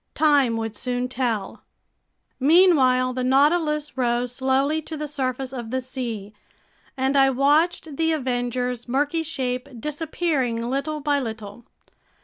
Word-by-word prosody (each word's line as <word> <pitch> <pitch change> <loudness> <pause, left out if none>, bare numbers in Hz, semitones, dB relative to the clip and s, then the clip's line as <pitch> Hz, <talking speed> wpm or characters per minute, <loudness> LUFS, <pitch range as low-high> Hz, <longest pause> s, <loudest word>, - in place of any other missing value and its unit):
Time 285 -7 +3
would 225 -1 -4
soon 250 +2 -2
tell. 235 -6 -3 0.8
Meanwhile 265 -5 +4
the 255 0 -2
Nautilus 300 +3 +2
rose 245 -1 0
slowly 270 +4 +1
to 315 0 -7
the 300 - -3
surface 265 -2 -3
of 240 -3 -6
the 260 +2 -1
sea, 235 -5 -5 0.6
and 265 +1 0
I 270 -1 +5
watched 295 +3 +1
the 325 0 +2
Avenger's 250 -3 -2
murky 290 +5 0
shape 255 -5 -3
disappearing 290 -5 -2
little 300 +3 -2
by 290 0 +1
little. 220 -2 -7
265 Hz, 130 wpm, -23 LUFS, 245-295 Hz, 0.8 s, I